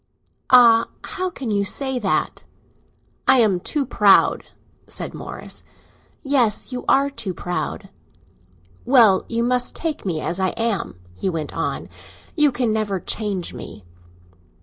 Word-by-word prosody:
"Ah, 235 -3 +7 0.2
how 370 0 -3
can 265 -9 -5
you 200 -1 +1
say 265 +5 -1
that?" 200 -5 -1 0.8
"I 265 - +6
am 200 -5 +2
too 285 - -2
proud," 210 -5 +4 0.4
said - - -6
Morris. - - -8 0.6
"Yes—you 250 -3 0
are 280 +1 +3
too 225 -8 -4
proud!" 175 +2 -4 0.9
"Well, 230 -7 +5
you 235 0 0
must 250 0 -1
take 325 -2 -3
me 175 -5 -2
as 170 +4 -3
I 185 -1 0
am," 220 - -2
he 90 - -3
went 160 -4 -4
on, - - -3 0.5
"you 300 -3 +4
can 240 -3 0
never 210 -3 -1
change 200 -2 -3
me." 100 - -10
225 Hz, 130 wpm, -21 LUFS, 190-260 Hz, 0.9 s, Ah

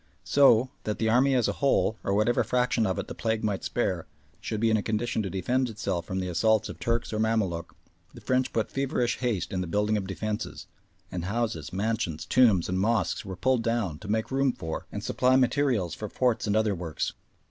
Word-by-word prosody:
So, 130 -3 +5
that 105 - -2
the 110 - +1
army 130 +4 +4
as 125 -3 +2
a - - +1
whole, 135 -5 +2
or 100 - 0
whatever 110 +4 +2
fraction 125 -3 +1
of 95 - -1
it - - -3
the - - -6
plague 110 -1 -1
might 105 -3 -1
spare, 95 -8 -1 0.3
should 110 +1 -4
be 115 0 +2
in 110 - +4
a - - 0
condition 110 +2 -1
to 100 - -3
defend 125 +8 0
itself 100 -6 -3
from 95 - -2
the 90 - -2
assaults 105 +5 +2
of - - -8
Turk 115 -1 0
or 110 - -1
Mamaluk, 110 -7 -1 0.4
the - - -12
French 130 0 +1
put 110 - -1
feverish 125 -3 0
haste 115 -6 -1
in 90 - -1
the 90 - -3
building 105 +4 +1
of 95 -2 -3
defences, 105 +2 -4 0.5
and 90 -2 -4
houses, 115 +3 -2
mansions, 100 -5 -2
tombs, 110 -9 +4
and 95 +1 -1
mosques 110 +2 +1
were 95 -2 -6
pulled 130 +5 +1
down 115 -10 -1
to 110 - -10
make 110 +3 -1
room 135 -1 +2
for 80 -3 -5
and - - -5
supply 130 0 +2
materials 125 - +2
for 105 +4 -6
forts 125 -1 0
and 105 - +1
other 110 -1 +2
works. 85 -4 -3
110 Hz, 215 wpm, -27 LUFS, 95-120 Hz, 0.5 s, So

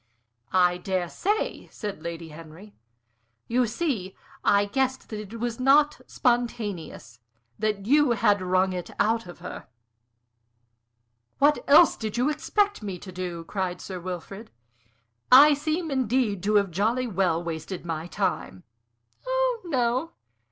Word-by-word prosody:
"I 180 -1 +3
dare 185 -2 -2
say," 415 - -2
said 205 -7 -6
Lady 165 0 -6
Henry. 165 +6 -12 0.7
"You 245 +1 +2
see, 220 - -2 0.3
I 200 0 +4
guessed 260 +5 -1
that 215 - -5
it 215 +2 -8
was 235 0 -3
not 290 +3 +4
spontaneous; 210 - -2 0.4
that 210 -2 -1
you 290 +1 +4
had 205 -2 +2
wrung 185 +1 +1
it 180 -1 -5
out 225 -1 +1
of 175 - -10
her." - - -8 1.7
"What 290 +2 +3
else 310 +4 +7
did 220 0 -4
you 250 +4 +2
expect 410 - 0
me 195 -3 -5
to 185 +2 -10
do?" 180 -2 -5
cried 180 0 -3
Sir 185 -2 -7
Wilfrid. 185 +4 -7 0.8
"I 290 +4 +9
seem, 310 +3 -2
indeed, 250 -6 0
to 210 +1 +2
have 200 -3 +3
jolly 225 +8 0
well 180 -6 0
wasted 170 +2 -5
my 165 0 -4
time." 95 - -3 0.6
"Oh - - 0
no. 260 +1 0
210 Hz, 135 wpm, -26 LUFS, 180-260 Hz, 1.7 s, I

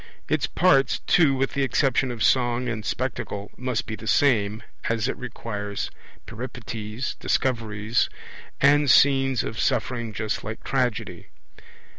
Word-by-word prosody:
Its 145 -4 +1
parts, 140 -7 +3
too, 150 -6 +4
with 135 0 -1
the 140 - 0
exception 135 0 +2
of 120 -3 -3
Song 125 -1 +2
and 110 -2 -3
Spectacle, 105 -5 -3
must 125 -3 -2
be 110 - -5
the 110 - -10
same, 110 -6 +2 0.3
as 115 0 0
it - - -2
requires 105 -5 -5 0.3
Peripeties, 115 0 -5
Discoveries, 115 -3 0 0.5
and 145 +1 +4
scenes 135 -1 +4
of 110 - -5
suffering 120 -2 0
just 110 +2 -3
like 110 +2 -6
Tragedy. 125 -4 -2
120 Hz, 130 wpm, -25 LUFS, 110-135 Hz, 0.5 s, too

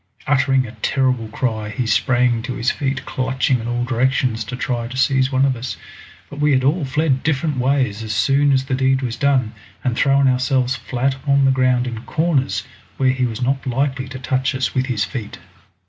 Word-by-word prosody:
Uttering 135 -2 +2
a 110 - -8
terrible 130 -4 +1
cry, 110 -2 -2
he 120 +3 -3
sprang 120 +1 +2
to 125 +1 -5
his 130 0 +1
feet 135 -1 -3
clutching 130 0 0
in 115 - -5
all 120 0 -1
directions 125 -1 0
to 125 - -5
try 120 -2 -2
to 130 +2 -7
seize 130 0 +2
one 130 +1 +3
of 135 -2 +1
us, 120 +1 -5 0.5
but 145 - -10
we 150 -1 +3
had 130 -1 +2
all 150 +5 +2
fled 135 0 0
different 150 -1 0
ways 130 -5 +1
as 110 -1 -5
soon 135 +8 +3
as 130 -1 +2
the 130 - -3
deed 130 0 +2
was 120 -2 -2
done, 130 -6 +1 0.3
and 125 -2 0
thrown 140 +1 +3
ourselves 130 0 +1
flat 130 +1 -1
upon 140 +1 +1
the 135 - +4
ground 130 -1 +2
in 115 -3 -5
corners 135 - 0 0.3
where 130 -1 +3
he 130 -1 0
was 115 +1 -4
not 135 +1 -1
likely 130 +1 -1
to 130 0 -7
touch 130 0 -1
us 130 -6 -1
with 130 0 0
his 110 -7 0
feet. 105 +3 -6
130 Hz, 205 wpm, -20 LUFS, 120-135 Hz, 0.5 s, the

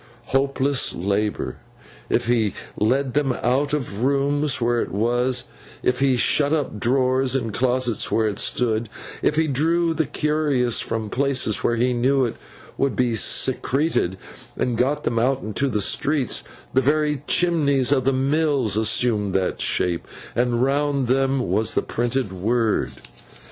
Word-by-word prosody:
Hopeless 135 0 +1
labour! 100 -7 -2 0.5
If - - +1
he 115 -4 +1 0.2
led 130 +4 0
them 140 -3 +1
out 130 +4 0
of 125 -8 -3
rooms 140 +1 +1
where 120 0 +1
it - - -4
was, 120 +5 0 0.4
if 125 0 +1
he 135 -2 +2
shut 145 +4 +2
up 145 -9 -1
drawers 130 +2 +1
and 115 -5 -2
closets 125 -1 0
where 110 -1 +2
it 105 -1 -3
stood, 115 -2 0 0.3
if 150 - +1
he 160 +1 +2
drew 165 +4 +1
the 160 -3 -1
curious 145 -6 0
from 110 -2 -3
places 135 -5 +1
where 120 - +1
he 125 +2 +1
knew 130 +2 +2
it 115 - -4 0.4
to 140 - +2
be 125 -3 0
secreted, 130 - +1 0.4
and 125 -2 -1
got 140 +5 0
them 115 - 0
out 130 +3 0
into 110 +6 -1
the 105 -4 -1
streets, 140 +6 +1 0.3
the 130 - +3
very 150 +1 +1
chimneys 145 -7 +2
of 135 -3 +2
the 135 - +2
mills 135 -3 +1
assumed 110 -2 +1
that 95 -1 0
shape, 85 -2 0 0.3
and 120 0 +1
round 140 -1 0
them 135 0 +1
was 110 +1 0
the - - +1
printed 120 -3 -2
word. 110 +4 0
130 Hz, 150 wpm, -22 LUFS, 115-140 Hz, 0.5 s, the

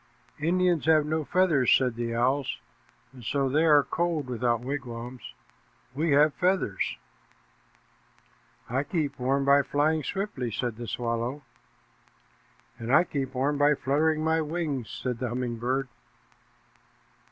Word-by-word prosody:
"Indians 175 0 +1
have 155 -2 +5
no 155 +1 -1
feathers," 155 -6 +2
said 130 -2 +4
the 115 0 -3
owl, 130 +3 +1 0.7
"and 125 -2 -13
so 135 +4 0
they 150 +5 +2
are 150 -3 +6
cold 170 -3 -1
without 120 -1 0
wigwams. 125 -2 -6 0.6
We 155 +5 -1
have 150 +1 +5
feathers." 180 - 0 1.7
"I 130 +3 0
keep 150 -2 -3
warm 135 +2 +1
by 140 +1 +6
flying 145 +4 +1
swiftly," 190 - -3
said 115 0 -3
the 120 -1 -6
swallow. 120 +5 -3 1.4
"And 115 +1 -4
I 155 - +6
keep 135 -6 -4
warm 140 +3 0
by 145 +1 +4
fluttering 155 +4 +1
my 160 0 +2
wings," 150 -7 -3
said 125 -2 -4
the 125 -1 -2
humming 120 -1 -3
bird. 130 +3 -1
140 Hz, 130 wpm, -27 LUFS, 125-155 Hz, 1.7 s, are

